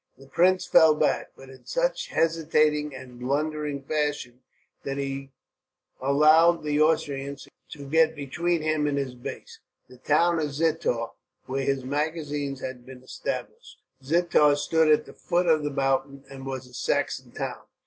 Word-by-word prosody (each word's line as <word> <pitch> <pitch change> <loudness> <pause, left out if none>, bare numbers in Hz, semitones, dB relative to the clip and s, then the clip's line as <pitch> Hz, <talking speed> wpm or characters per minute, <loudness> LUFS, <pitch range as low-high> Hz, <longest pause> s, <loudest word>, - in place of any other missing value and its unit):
The 135 - -15
prince 180 +6 +2
fell 160 -3 +6
back, - - 0
but 135 0 -13
in 130 - -17
such - - -1
hesitating 155 -3 +1
and 125 -2 -11
blundering 145 +2 -2
fashion 145 -4 -2 0.4
that 135 0 -4
he 135 0 -4 0.7
allowed 155 +5 +5
the 150 0 +1
Austrians 140 -3 0 0.3
to 140 -3 -10
get 160 +2 +3
between 165 +4 -1
him 155 -1 +1
and 145 -1 -1
his 135 -2 -2
base, 125 0 -9 0.3
the 125 - -16
town 165 +6 +2
of 150 -3 -2
Zittau, 150 -7 0 0.3
where 135 +1 -2
his 135 -2 -1
magazines 145 -1 -3
had 130 -1 -6
been 130 0 -13
established. 130 - -6 0.3
Zittau 150 -1 +3
stood 160 +1 +2
at 150 - +3
the - - -13
foot 175 0 0
of 160 -3 +3
the 145 - -1
mountain, 135 0 -1
and 135 0 -9
was 130 -1 -5
a 125 - -18
Saxon - - -1
town. - - -6
145 Hz, 155 wpm, -26 LUFS, 135-160 Hz, 0.7 s, fell